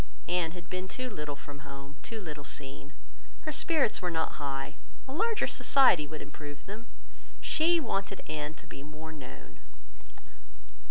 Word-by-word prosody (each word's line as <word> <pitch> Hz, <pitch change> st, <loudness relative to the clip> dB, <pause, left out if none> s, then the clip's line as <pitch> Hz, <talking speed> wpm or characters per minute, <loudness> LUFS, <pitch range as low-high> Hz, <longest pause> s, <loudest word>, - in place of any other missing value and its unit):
Anne 175 Hz, -2 st, +3 dB
had 175 Hz, -2 st, -8 dB
been 185 Hz, +1 st, -2 dB
too 255 Hz, +5 st, -2 dB
little 150 Hz, -6 st, -3 dB
from 145 Hz, 0 st, -9 dB
home, 140 Hz, 0 st, -8 dB
too 225 Hz, -, -4 dB
little 150 Hz, -7 st, -5 dB
seen. 140 Hz, +1 st, -5 dB, 0.5 s
Her 310 Hz, -, -2 dB
spirits 300 Hz, -, +3 dB
were 180 Hz, -, +1 dB
not 160 Hz, -2 st, 0 dB
high. 135 Hz, -1 st, -2 dB, 0.3 s
A 265 Hz, -, -4 dB
larger 445 Hz, +7 st, +3 dB
society 220 Hz, -, +6 dB
would 155 Hz, +1 st, -5 dB
improve 145 Hz, 0 st, -8 dB
them. 215 Hz, +4 st, -6 dB, 0.5 s
She 335 Hz, +2 st, +5 dB
wanted 195 Hz, -8 st, 0 dB
her 150 Hz, -1 st, -1 dB
to 155 Hz, -, -10 dB
be -, -, -8 dB
more 150 Hz, +2 st, -7 dB
known. 65 Hz, -, -9 dB
160 Hz, 155 wpm, -32 LUFS, 145-215 Hz, 0.5 s, society